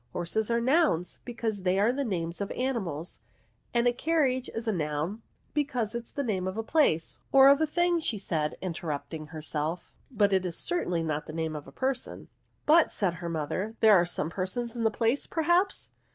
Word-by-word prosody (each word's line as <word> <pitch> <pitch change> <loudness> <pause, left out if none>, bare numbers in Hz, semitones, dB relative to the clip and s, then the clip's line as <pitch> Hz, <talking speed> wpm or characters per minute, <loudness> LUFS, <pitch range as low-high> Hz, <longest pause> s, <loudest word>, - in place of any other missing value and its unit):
Horses 210 +6 -1
are 235 0 +2
noims, 255 - +2
because 225 -4 -3
they 185 +1 +1
are 220 +4 +3
the 280 +2 -1
names 175 -6 -3
of 200 - -2
animals; 190 - -3 0.5
and 240 0 +2
a 245 - +3
carriage 260 -3 +1
is 225 +1 -5
a - - +3
noun, 160 +4 -2 0.3
because 250 -7 -1
it 235 0 -4
is - - -22
the 280 - -2
name 190 -7 -1
of 190 +3 -4
a 225 - -1
place 220 - +1
— - - -41
or 270 0 +8
of 280 +2 +5
a 315 - +3
thing," 345 +2 +2
said 175 - -1
she, - - -7
interrupting 160 -2 -4
herself; 155 +2 -4 0.2
but 205 -6 +2
it 190 -1 +3
is 175 -3 -3
certainly 180 - 0
not 155 -1 -2
the 155 - -7
name 160 -1 -2
of 145 -2 -7
a - - -11
person." 260 - -3
*^ - - -17 0.4
But," 325 +2 +6
said 190 -4 0
her 170 - -3
mother, 170 +7 -3
" - - -43
there 220 -1 +7
are 175 -3 +5
some 165 -2 -2
persons 225 +6 -3
in 230 -1 -1
the - - +5
place, 230 +5 0
perhaps 345 +4 +1
210 Hz, 210 wpm, -28 LUFS, 170-255 Hz, 0.5 s, or